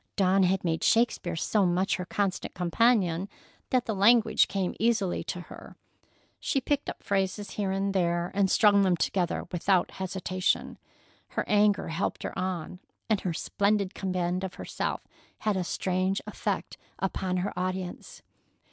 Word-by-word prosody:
Dawn 195 0 +3
had 190 0 +2
made 165 -2 -1
Shakespeare 225 -7 +2
so 200 +5 +1
much 185 +1 +1
her 180 - -4
constant 195 0 -2
companion 185 -1 +2 0.4
that 255 -1 +2
the 220 - -1
language 220 +3 +5
came 195 -2 -1
easily 220 -5 +1
to 180 - -4
her. - - -12 0.6
She 275 - 0
picked 285 +2 -1
up - - -8
phrases 200 +1 -1
here 200 -2 -2
and 195 +1 0
there 175 -2 0
and 195 -1 +2
strung 205 -1 +5
them 185 -3 +3
together 175 0 0
without 180 +1 +1
hesitation. 185 0 -2 0.5
Her - - -3
anger 210 -3 +3
helped 165 +4 -2
her - - -4
on, 180 -1 -3 0.3
and 210 - +2
her 180 - -2
splendid 200 +1 0
command 185 -1 -1
of 190 - -5
herself - - -4 0.3
had 215 -2 0
a 185 - 0
strange 185 +2 0
effect - - -3 0.2
upon 185 -1 -1
her 180 +2 -2
audience. 185 0 -4
190 Hz, 150 wpm, -28 LUFS, 180-205 Hz, 0.6 s, language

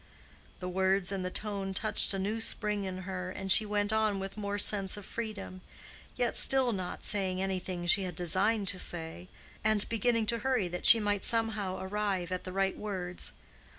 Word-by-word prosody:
The 180 - -4
words 190 +1 +1
and 195 -2 -3
the 180 - -2
tone 195 -1 -3
touched 210 +1 +2
a 195 - +1
new 210 +4 -2
spring 210 -2 0
in 185 0 -5
her, 185 -1 -5
and 190 +1 -3
she 215 +4 +6
went 205 0 0
on 215 -2 +1
with 195 0 -6
more 205 -1 -3
sense 200 -1 +2
of 205 - -9
freedom, 210 -5 -6 0.5
yet 245 -1 0
still 265 -2 +4
not 185 -4 -5
saying 190 -2 +1
anything 185 -2 -3
she 185 +3 +4
had 180 -3 -4
designed 195 +5 0
to 185 - -1
say, 170 +1 -3 0.4
and 215 -1 +2
beginning 230 0 +1
to 230 +2 -1
hurry, 245 -5 0
that 180 +1 +1
she 230 - +10
might 205 -2 -1
somehow 220 -5 +2
arrive 190 -2 -2
at 185 -1 -4
the 185 - -5
right 195 +1 0
words. 185 -4 -3
195 Hz, 185 wpm, -30 LUFS, 185-210 Hz, 0.5 s, she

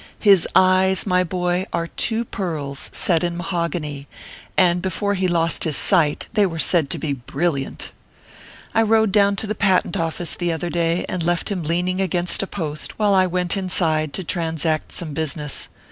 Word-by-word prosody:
His 195 -5 +5
eyes, 185 0 +4
my 180 -2 +2
boy, 180 +1 -2
are 165 - -2
two 225 +6 -2
pearls, 155 -9 -4
set 170 -3 +1
in 170 -1 -2
mahogany, 170 -6 -4 0.5
and 175 -1 +3
before 200 +2 -1
he 190 -1 0
lost 170 -2 +1
his 155 -4 +4
sight, 165 -7 +4
they 210 -3 +3
were 165 -2 -6
said 160 -2 +2
to - - -1
be 150 -3 -3
brilliant. 140 +2 -3 0.8
I 225 - +3
rode 220 -1 +2
down 200 0 +3
to 200 - -2
the 215 - -2
Patent 190 -4 +1
Office, 165 +1 -2
the 175 -1 -2
other 170 +1 -4
day, 170 0 0
and 185 - -4
left 175 +1 -1
him 190 -3 -2
leaning 180 +4 -1
against 180 -1 +2
a 195 - -3
post, 155 -6 -4
while 210 -2 +2
I 185 -1 +4
went 180 +1 -1
inside 160 -5 0
to 190 - -4
transact 160 -3 -2
some 160 -4 -3
business. 150 -1 -2
175 Hz, 175 wpm, -21 LUFS, 160-190 Hz, 0.8 s, His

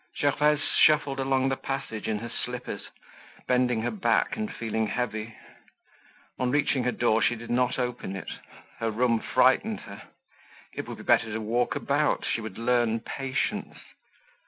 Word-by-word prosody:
Gervaise 150 +1 +3 0.2
shuffled 145 -3 +4
along 135 0 +2
the 135 - +1
passage 130 -6 -4
in 110 - 0
her 115 +2 -6
slippers, 125 -4 -5 0.6
bending 125 -3 +2
her - - 0
back 210 -3 +1
and 215 -1 -3
feeling 110 -1 -2
heavy. 110 -1 -3 1.0
On 125 - +1
reaching 135 -2 +1
her 125 - +2
door 115 -2 +2
she 120 - +3
did 120 +1 -8
not 125 +1 +2
open 125 -6 -3
it—her 115 +3 -7
room 115 +1 +2
frightened - - +2
her. - - -10 0.7
It - - -5
would - - -6
be - - -10
better 110 - +3
to 110 - -2
walk 115 +3 0
about, - - +1
she 115 - -1
would 110 -3 -7
learn 115 -1 +1
patience. 135 -1 -3
125 Hz, 155 wpm, -27 LUFS, 110-135 Hz, 1.0 s, shuffled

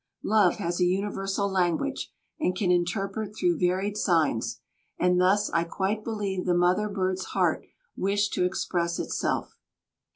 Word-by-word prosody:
Love 210 -5 +4
has 175 +1 -3
a - - +3
universal 195 +1 -1
language 190 - -1 0.3
and 185 -12 0
can 185 -2 +1
interpret 195 +4 -1
through 175 -4 +2
varied 185 +4 0
signs, 165 - +1 0.4
and 180 0 +3
thus 195 +3 +3
I 170 - +2
quite 195 +5 -2
believe 200 -5 -3
the 175 - +3
mother 180 +4 +2
bird's 190 -2 -1
heart - - +1 0.3
wished 205 +2 0
to - - +1
express 175 -2 -1
itself. - - -2
185 Hz, 140 wpm, -27 LUFS, 180-205 Hz, 0.4 s, Love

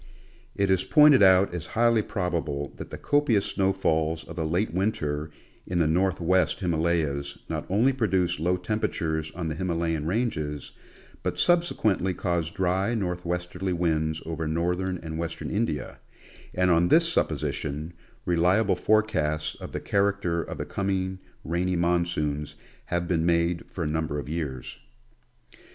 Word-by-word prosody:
It 100 -1 +1
is 95 -1 +3
pointed 150 -4 +6
out 95 -1 +6
as 90 -3 -5
highly 115 -1 +4
probable 80 -8 -3
that - - -8
the - - -7
copious 145 -9 +2
snowfalls 80 -5 0
of 85 - -10
the 80 -2 -2
late 90 +6 0
winter 80 -6 -1 0.4
in 90 - -2
the 85 - +3
northwest 90 +2 +2
Himalayas 80 -5 0
not - - -4
only 115 +8 +3
produce 95 - +1
low 90 +3 +1
temperatures 80 -5 -2
on 85 -2 -3
the 80 - -2
Himalayan 80 -2 -1
ranges, 80 - -2 0.5
but - - -2
subsequently 110 - +2
cause 85 -2 -1
dry 95 +4 0
northwesterly 90 -1 -2
winds 80 -2 0
over 80 -1 -3
northern 90 +3 -1
and 80 0 -5
western 85 0 -4
India, 100 - -2 0.6
and 90 0 +3
on 85 +1 +4
this 165 - +5
supposition, 75 - -2 0.3
reliable 90 +5 +3
forecasts 80 -8 +1
of - - -9
the - - -3
character 100 -4 0
of - - -6
the - - -4
coming 95 -1 -2 0.3
rainy 90 +3 0
monsoons 85 -4 0 0.3
have 85 0 -2
been 85 -3 +1
made 85 0 +1
for 90 - -4
a - - -1
number 80 -1 -2
of 70 - -5
years. 75 -5 -5
85 Hz, 140 wpm, -26 LUFS, 80-95 Hz, 0.6 s, pointed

